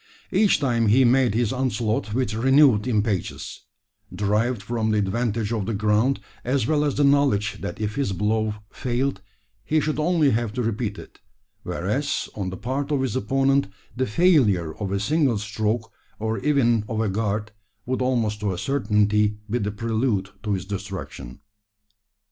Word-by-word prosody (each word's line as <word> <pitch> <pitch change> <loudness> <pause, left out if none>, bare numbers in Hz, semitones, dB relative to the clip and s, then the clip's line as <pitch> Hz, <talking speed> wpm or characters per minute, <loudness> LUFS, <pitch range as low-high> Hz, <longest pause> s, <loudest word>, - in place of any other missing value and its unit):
Each 200 +2 +3
time 120 -5 +1
he 125 +5 +5
made 125 -3 +3
his 120 0 +1
onslaught 110 -4 -1
with 115 -1 -1
renewed 130 -1 +4
impetus, 105 -4 -2 0.5
derived 105 +2 0
from 110 0 -1
the 110 - +2
advantage 110 +2 -1
of 105 -4 -2
the 115 - -1
ground, 105 +6 +2 0.2
as 130 -1 0
well 150 +2 +2
as 145 -2 0
the 145 - +2
knowledge 140 -8 +2
that 85 - -5
if 105 -1 -2
his 140 -8 0
blow 105 +2 0 0.2
failed, 130 +2 -2 0.4
he 155 +8 +1
should 155 0 -1
only 155 -3 +3
have 115 -1 -1
to 125 +1 -2
repeat 110 -2 -2
it; - - -12 0.4
whereas, 105 +12 -2
on 95 -3 -3
the 95 - -6
part 135 +7 -3
of 140 -2 +1
his 130 - -2
opponent, 135 +3 +2 0.3
the 130 +1 0
failure 105 - +3
of 100 -3 -4
a 100 - 0
single 135 +2 +1
stroke, 110 +2 -2 0.3
or 110 +1 -2
even 120 -7 +2
of 110 - -2
a 110 - +1
guard, 105 +1 -2 0.3
would 130 +1 -2
almost 115 -5 0
to 105 -1 -1
a 90 - -4
certainty 105 -4 +1
be 120 +3 -1
the 105 -2 -1
prelude 110 -2 -1
to 105 -2 -1
his 95 -1 -3
destruction. 95 -10 -7
110 Hz, 165 wpm, -24 LUFS, 105-130 Hz, 0.5 s, he